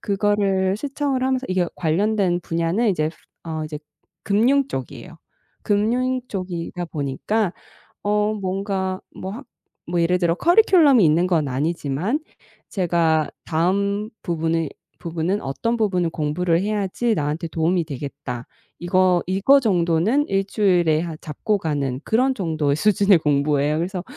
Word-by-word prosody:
그거를 200 -2 +1
시청을 275 +1 -2
하면서 260 0 0
이게 185 -1 +1
관련된 185 +2 +1
분야는 170 +8 0
이제 155 -3 0 0.3
어 160 -2 -4
이제 150 -1 -6 0.4
금융 255 +7 +2
쪽이에요. 130 -2 -7 0.5
금융 245 +5 +1
쪽이다 180 -2 -4
보니까 170 +7 -2 0.5
어 210 +1 +1
뭔가 190 -1 -2 0.2
뭐 190 - -6
하 260 +5 -8 0.4
뭐 175 0 0
예를 180 +2 +2
들어 170 -2 +1
커리큘럼이 335 - +5
있는 165 +4 +3
건 160 -5 +1
아니지만 155 - -1 0.5
제가 165 -5 +1 0.2
'다음 200 +6 0
부분의 165 -2 -1 0.3
부분은 170 +4 -2
어떤 230 - -2
부분을 180 -6 +1
공부를 165 +3 0
해야지 210 +3 -1
나한테 155 0 -2
도움이 170 +2 +1
되겠다.' 140 -4 -6 0.3
이거 180 0 +2
이거 200 +10 +4
정도는 190 - +1
1 195 0 +1
주일에 175 -7 +2
하 165 -2 -5
잡고 195 +8 -2
가는 140 -5 -2
그런 255 +4 +2
정도의 160 - 0
수준의 200 +2 +4
공부예요. 145 0 +1
그래서 180 +2 -3
180 Hz, 295 characters per minute, -22 LUFS, 160-210 Hz, 0.5 s, 커리큘럼이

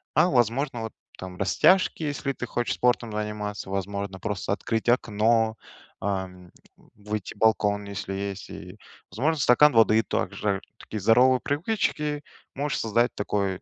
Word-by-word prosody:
а 165 +4 +5
возможно, 120 +1 +1
вот 110 - -5 0.3
там 90 -1 -8
растяжки, 185 - +3
если 145 -1 -2
ты 125 - -5
хочешь 120 0 -2
спортом 120 -2 +1
заниматься, 105 -1 -4
возможно, 100 0 -4
просто 100 0 -2
открыть 115 +2 -2
окно, 110 -1 +2 0.4
ам, 95 -2 -4 0.5
выйти 105 -1 -5
в - - -21
балкон, 105 -2 +2
если 100 -1 -5
есть. 100 0 -5
И, - - -10 0.3
возможно, 150 +7 0
стакан 140 +3 +5
воды, 110 -1 +5
также. 100 -3 -2 0.2
Такие 110 - -7
здоровые 125 +5 +5
привычки 150 -3 -1 0.3
можешь 145 +1 -2
создать 115 +2 +1
такой 100 -2 -1
110 Hz, 135 wpm, -26 LUFS, 100-125 Hz, 0.5 s, а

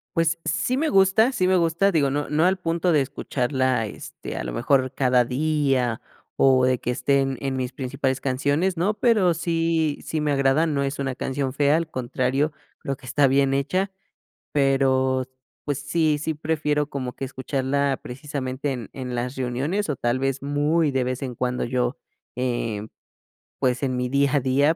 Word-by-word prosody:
Pues, 165 0 +1
sí 170 - 0
me 310 +3 +1
gusta 195 +6 +4
sí 185 -7 +1
me 185 - +4
gusta, 170 +3 +2
digo, 145 -5 +2
no 145 +2 -2
no 155 +3 +2
al 190 +1 +3
punto 170 0 0
de 150 -3 +4
escucharla, 130 -2 -1
este, 105 - -8
a - - -3
lo - - -5
mejor, 130 - +2
cada 125 -2 +3
día 135 -3 0 0.3
o 130 -1 +4
de 130 -1 +2
que - - -4
estén, 135 0 +1
en 135 -1 -2
mis 130 0 -3
principales 130 0 -2
canciones, 145 +7 0
¿no? 195 +6 +1
Pero 210 -6 +3
sí 165 -2 0
sí 155 - -2
me 150 -1 +1
agrada, 140 +3 +3
no 140 -2 0
es 140 0 -2
una 135 -2 -1
canción 130 0 -2
fea, 145 +1 +3
al 165 -1 -2
contrario, 130 +3 -1 0.3
creo 135 - -3
que - - -16
está 140 +3 +3
bien 135 0 +3
hecha, 185 +8 0 0.6
pero, 130 -2 +2 0.4
pues, 145 -1 -2
sí 150 +1 +1
sí 160 +2 -2
prefiero 150 -1 -1
como 130 -3 -4
que - - -7
escucharla, 135 +1 -1
precisamente, 135 0 -4
en 120 -5 -7
en 125 -2 -5
las 125 +2 -3
reuniones, 135 +10 -1
o 145 - 0
tal 120 +2 0
vez, 135 0 -1
muy 145 +2 +1
de 130 -1 +1
vez 130 +2 -3
en 125 -3 -4
cuando 125 +1 -1
yo, 125 +1 0 0.4
eh, 120 -4 -2 0.7
pues, 125 0 +1
en 130 -1 0
mi 125 0 -1
día 140 +1 +2
a - - +4
día, 140 +5 +3
140 Hz, 180 wpm, -24 LUFS, 130-155 Hz, 0.7 s, gusta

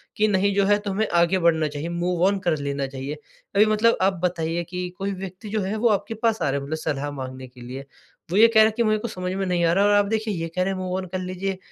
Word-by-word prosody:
कि, 215 - +3
"नहीं, 200 0 +2
जो 200 -1 +3
है, 205 +1 +4
तुम्हें 205 +2 0
आगे 175 +2 +2
बढ़ना 165 -2 +3
चाहिए, 150 +3 -5
मूव 175 0 -1
ऑन 200 0 +1
कर 175 -5 0
लेना 140 -1 -2
चाहिए।" 135 +2 -6 0.4
अभी 205 +2 +6
मतलब 215 +2 +3
आप 190 +1 +3
बताइए 170 -1 -1
कि 180 0 -4
कोई 195 +1 -2
व्यक्ति 190 +2 -8
जो 215 0 -1
है, 195 +3 -2
वो 235 +2 +2
आपके 215 +2 0
पास 225 0 0
आ - - +1
रहा 140 - 0
है, - - -7
मतलब 155 +3 -3
सलाह 145 -2 -3
माँगने 130 -2 -7
के 125 0 -16
लिए। 130 +3 -7 0.5
वो 190 - +1
ये 225 - +8
कह 230 -1 +4
रहा - - +8
है 220 - +2
कि, 235 - +3
"मेरे 215 -1 +2
को 235 - -4
समझ 185 -4 -4
में 195 0 -2
नहीं 180 -2 0
आ 165 - +3
रहा।" 195 +3 +3
और 205 - +4
आप 205 0 +4
देखिए, 220 +1 -1
ये 165 -2 -3
कह 185 - +2
रहे 195 - -1
हैं, 190 - -5
मूव 185 0 -3
ऑन 190 - -4
कर 185 - -1
लीजिए। 185 +1 -3
185 Hz, 290 wpm, -24 LUFS, 165-205 Hz, 0.5 s, ये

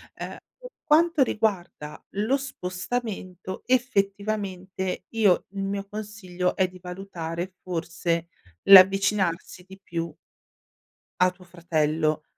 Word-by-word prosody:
Ehm, - - -6 0.2
per - - -11
quanto 325 -1 +4
riguarda 190 -10 -2
lo 215 +7 +2
spostamento, 190 -5 -5
effettivamente, 200 -6 -1
io 210 -6 +3
il 195 -1 -4
mio 200 0 -3
consiglio 200 -4 -3
è 190 - +3
di 185 0 -13
valutare 180 -1 -5
forse 170 -1 -2 0.4
l'avvicinarsi 190 -2 +5
di 190 +1 -14
più 170 -3 -4 1.1
a 180 0 +5
tuo 180 0 -18
fratello. 155 -3 0
190 Hz, 100 wpm, -26 LUFS, 175-210 Hz, 1.1 s, l'avvicinarsi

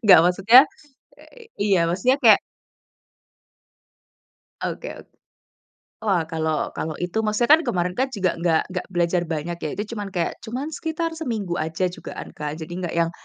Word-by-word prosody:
Nggak 185 -6 +9
maksudnya 195 +8 +7 0.6
eee, 475 -2 -16 0.2
iya, 195 -5 +3
maksudnya 200 +9 +2
kayak - - +7 2.2
Oke - - -4
oke. - - -14 0.9
Wah 195 -6 +1
kalau 160 -1 -1
kalau 155 -1 -4
itu, 180 +5 -2
maksudnya 220 +4 +1
kan - - -2
kemarin 180 0 0
kan 260 +8 0
juga 200 -9 0
enggak 165 -2 +2
enggak 180 0 -3
belajar 175 -1 +1
banyak 165 +1 -3
ya. 155 - -3
Itu 205 - -2
cuman 205 -2 -4
kayak, 170 -2 -1
cuman 260 +7 -5
sekitar 325 +1 -3
seminggu 225 - -3
aja 160 +3 -1
jugaan, - - -8
Kak. 150 0 -5
Jadi 160 +1 -8
nggak 175 -3 -4
yang 170 0 +1
180 Hz, 155 wpm, -23 LUFS, 170-220 Hz, 2.2 s, Nggak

